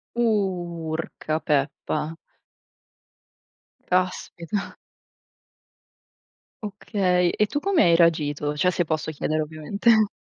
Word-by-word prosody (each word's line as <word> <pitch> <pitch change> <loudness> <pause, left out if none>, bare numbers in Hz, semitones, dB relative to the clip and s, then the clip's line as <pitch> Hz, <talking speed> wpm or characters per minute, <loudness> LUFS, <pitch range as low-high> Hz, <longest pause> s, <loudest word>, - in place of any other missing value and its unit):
Urca, 175 -8 -1
peppa. 150 +2 -1 1.7
Caspita. 185 +1 -1 1.9
Okay. 190 -3 +1
E 210 - +4
tu 290 - -2
come 390 -1 +3
hai 170 - +5
reagito? 150 -3 +2
Cioè, 180 +5 +2
se 175 - +1
posso 155 0 -2
chiedere, 155 +1 -1
ovviamente. 200 +8 +2
175 Hz, 80 wpm, -24 LUFS, 155-200 Hz, 1.9 s, hai